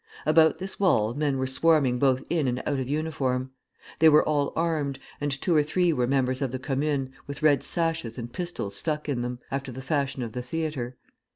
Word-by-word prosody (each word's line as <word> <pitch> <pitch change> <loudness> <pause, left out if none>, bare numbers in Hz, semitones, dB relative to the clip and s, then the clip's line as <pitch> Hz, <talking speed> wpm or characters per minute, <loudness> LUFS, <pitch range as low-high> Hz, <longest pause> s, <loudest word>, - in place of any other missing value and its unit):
About 160 +1 +5
this 190 +1 -4
wall 115 - +3
men 145 -1 0
were 130 - 0
swarming 135 -2 +3
both 130 -1 +2
in 160 -5 0
and 125 0 0
out 145 -2 0
of 130 -1 -3
uniform. 135 -4 -1 0.5
They 160 +1 +8
were 150 0 +5
all 145 -2 +1
armed, 155 -5 0 0.2
and 145 - 0
two 150 +5 +1
or 150 - +6
three 170 +3 +1
were 125 -4 +1
members 130 0 +1
of 135 -3 -1
the 130 - -2
Commune, 135 0 -1
with 140 +1 -7
red 145 -4 +5
sashes 165 -9 -2
and 120 -1 -6
pistols 170 - -4
stuck 150 +5 -2
in 135 -5 -1
them, 125 0 -3
after 135 -1 -3
the 130 - -8
fashion 140 -2 -1
of 115 - -5
the 125 - -4
theatre. 130 -3 -4
140 Hz, 205 wpm, -26 LUFS, 130-155 Hz, 0.5 s, They